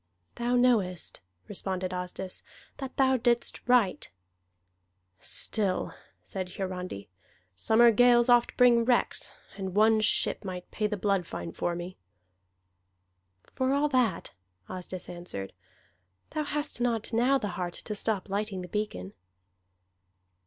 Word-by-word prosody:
"Thou 240 +1 0
knowest," 220 -9 +2 0.3
responded 185 -2 -3
Asdis, 180 +1 -5 0.4
"that 270 -2 -7
thou 265 -1 +4
didst 240 0 +1
right." 215 -11 +3 1.1
"Still," 195 - 0 0.3
said 185 -2 -5
Hiarandi, 180 - -4 0.5
"summer 225 - +5
gales 240 +1 +5
oft 240 -1 +4
bring 240 -2 +6
wrecks, 245 0 +1 0.3
and 190 -2 -4
one 220 +1 +5
ship 215 - 0
might 180 -2 -6
pay 215 - 0
the 210 0 -3
blood 195 -3 0
fine 85 -1 -5
for 175 - -2
me." 175 +2 -6 1.5
"For 260 +1 -1
all 290 +1 +2
that," 250 -10 +1 0.3
Asdis 185 0 -6
answered, 175 - -5 0.8
"thou 305 -1 -2
hast 295 -4 -3
not 235 -2 0
now 250 +4 +4
the 210 -6 -3
heart 175 -1 -4
to 215 - -3
stop 210 -1 0
lighting 200 -1 -2
the - - -7
beacon." 175 - -3
210 Hz, 125 wpm, -29 LUFS, 180-240 Hz, 1.5 s, bring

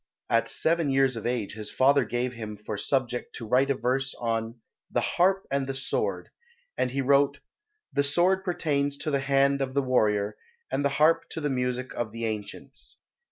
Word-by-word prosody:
At - - +2
seven 165 -2 +1
years 135 -1 +3
of 115 0 -4
age 120 -5 -2
his 105 0 -6
father 140 +1 +4
gave 120 +3 -2
him 110 -3 -7
for 105 +1 -5
subject 120 +3 -1
to 115 - -6
write 130 +5 +3
a 140 - +2
verse 135 +2 -1
on 115 0 -2 0.3
"The - - +1
Harp 190 +2 +2
and 140 -1 0
the 135 - -3
Sword," 135 - -2 0.5
and - - 0
he 135 +2 -1
wrote 140 +1 +3 0.6
"The 140 - +3
Sword 175 +7 +2
pertains 145 -6 -1
to 150 +2 -3
the 140 - +2
Hand 140 0 +2
of 130 0 -2
the 140 - +2
Warrior 105 -5 +1 0.3
And - - 0
the 140 - +3
Harp 155 +4 +3
to - - -5
the 145 -2 -1
Music 125 0 -2
of 115 -2 -3
the 115 +1 -4
Ancients." 105 - -6
135 Hz, 190 wpm, -27 LUFS, 115-140 Hz, 0.6 s, father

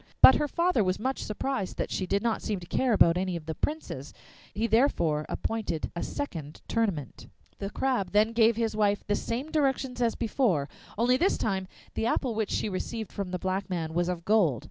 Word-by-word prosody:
But 260 - +10
her 295 - +1
father 340 - +2
was 185 0 0
much 265 +4 -2
surprised 210 -2 -3
that - - -2
she 185 - -2
did 200 +3 0
not 230 -2 0
seem 210 -3 -2
to 175 - -10
care 255 +7 +1
about 175 -5 +5
any 185 -1 -1
of 165 -2 -6
the 160 - -3
Princes; 310 - -4 0.4
he 220 - -1
therefore 210 - +2
appointed 220 -8 -2
a 170 - -3
second 160 - -5
tournament. 195 - -2 0.3
The 200 - -3
Crab 245 -4 0
then 215 +2 +4
gave 230 0 +4
his 225 -1 -1
wife 205 -1 +1
the 205 - 0
same 255 +9 -3
directions 265 -4 0
as 235 -1 +2
before, 210 - +1 0.3
only 245 +3 +3
this 370 +8 +2
time 190 -3 -1 0.3
the 225 - -1
apple 240 0 0
which 220 -2 -1
she - - 0
received 215 +3 -4
from 200 -2 -4
the 180 - -2
black 190 +2 -2
man 165 -3 -2
was 175 +1 +1
of 170 -2 -4
gold. 190 - +3
210 Hz, 205 wpm, -28 LUFS, 180-235 Hz, 0.4 s, But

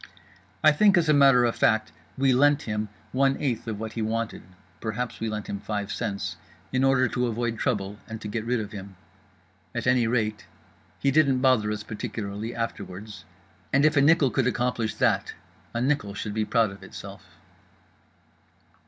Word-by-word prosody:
I 155 - +8
think, 200 +5 +5
as 165 -3 +2
a - - +6
matter 135 -4 +6
of 120 - 0
fact, 110 -1 +2 0.3
we 135 -1 +3
"lent" 145 +3 +4
him 105 -1 -3 0.2
one 135 +1 +2
eighth 120 -5 -2
of 110 -2 -3
what 110 0 -5
he 115 - -3
wanted 115 +1 -2 0.4
(perhaps 115 +2 -4
we 115 - -2
lent 105 -1 -4
him 100 - -4
five 105 0 -4
cents) 105 -3 -3 0.4
in 130 +1 +2
order 135 -1 +4
to 125 +1 0
avoid 115 -1 -2
trouble 105 -5 -1
and 110 0 -6
get 110 +1 -4
rid 120 +1 0
of 105 -1 -5
him. 100 -1 -9 0.8
At 115 - -2
any 125 -2 +3
rate, 110 -3 -1 0.5
he 140 - +1
didn't 140 -3 +4
bother 125 -6 +3
us 105 -1 -4
particularly 105 +1 -5
afterwards; 105 -4 -6 0.5
and 140 +2 +4
if 155 0 +4
a 140 - +5
nickel 145 -2 +4
could 130 -2 +1
accomplish 120 -3 -1
that - - +1 0.4
a 120 - -2
nickel 125 -6 0
should 105 0 -4
be 110 0 0
proud 110 -2 +2
of 95 -1 -12
itself. 95 - -11
115 Hz, 175 wpm, -26 LUFS, 105-130 Hz, 0.8 s, I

